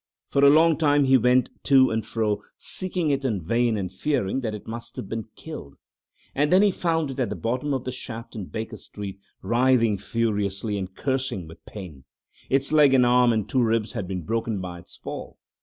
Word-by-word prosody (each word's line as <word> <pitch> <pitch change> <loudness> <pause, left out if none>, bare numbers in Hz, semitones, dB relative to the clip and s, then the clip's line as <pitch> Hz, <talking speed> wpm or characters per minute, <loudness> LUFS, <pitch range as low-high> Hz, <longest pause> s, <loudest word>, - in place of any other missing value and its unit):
For 140 - +2
a 140 - +9
long 160 +2 +5
time 145 -2 +4
he 135 0 +5
went 125 0 +3
to 130 -3 +5
and 110 0 -1
fro 110 -1 -1 0.2
seeking 180 -4 -2
it 140 0 0
in 115 -7 0
vain 115 +6 +1
and 95 -2 -3
fearing 130 +1 -1
that 110 -4 -3
it 105 - -9
must 115 +1 -7
have - - -6
been 115 0 -4
killed, 70 - -9 0.6
and 145 +2 +1
then 185 +2 +6
he 205 - +4
found 165 -5 0
it 135 - -7
at 125 -5 0
the - - -3
bottom 125 +5 -2
of 130 -3 -1
the 130 - -3
shaft 115 -2 -8
in 105 -4 -5
Baker 110 +3 -6
Street, 100 -1 -8 0.2
writhing 120 -4 +3
furiously 105 -1 -1
and 95 -1 -5
cursing 130 - -2
with 80 - -14
pain. 85 -10 -9 0.4
Its 135 +1 +1
leg 150 -3 +6
and 125 -1 +5
an 120 - +3
arm 125 -1 +5
and 110 -3 0
two 130 - +1
ribs 115 -2 +1
had 105 -7 -4
been 90 -2 -4
broken 115 +3 -2
by 90 -1 -6
its - - -13
fall. - - -8
115 Hz, 210 wpm, -25 LUFS, 105-135 Hz, 0.6 s, a